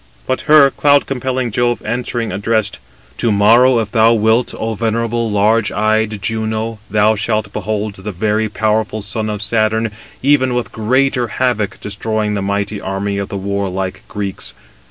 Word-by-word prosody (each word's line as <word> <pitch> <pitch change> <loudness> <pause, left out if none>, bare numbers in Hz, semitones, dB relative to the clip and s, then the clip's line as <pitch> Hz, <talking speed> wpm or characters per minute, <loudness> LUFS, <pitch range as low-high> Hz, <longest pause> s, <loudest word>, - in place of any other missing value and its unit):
But 130 - -1
her 145 -3 +7
cloud 145 0 +3
compelling 130 -2 -2
Jove 120 +2 +1
answering, 120 0 -2
addressed: 105 +2 -1 0.4
"To 115 - +1
morrow, 115 +5 +5
if 110 -3 -1
thou 115 0 +4
wilt, 110 +2 +2
O 115 0 -2
venerable, 115 +1 -1
large 105 +2 +2
eyed 110 0 0
Juno, 110 0 -2
thou 105 +1 +3
shalt 110 0 -2
behold 105 0 -2
the 100 +2 -6
very 105 +3 0
powerful 110 0 -1
son 110 +2 -3
of 105 0 -3
Saturn 110 0 +1 0.3
even 130 -3 +3
with 125 - -2
greater 125 +3 +1
havoc 115 -3 -1
destroying 105 +1 -2
the 100 - -2
mighty 100 +1 -2
army 100 +1 -2
of 100 - -4
the 100 - -4
warlike 95 -1 -3
Greeks. 100 -1 -5
110 Hz, 155 wpm, -16 LUFS, 105-115 Hz, 0.4 s, her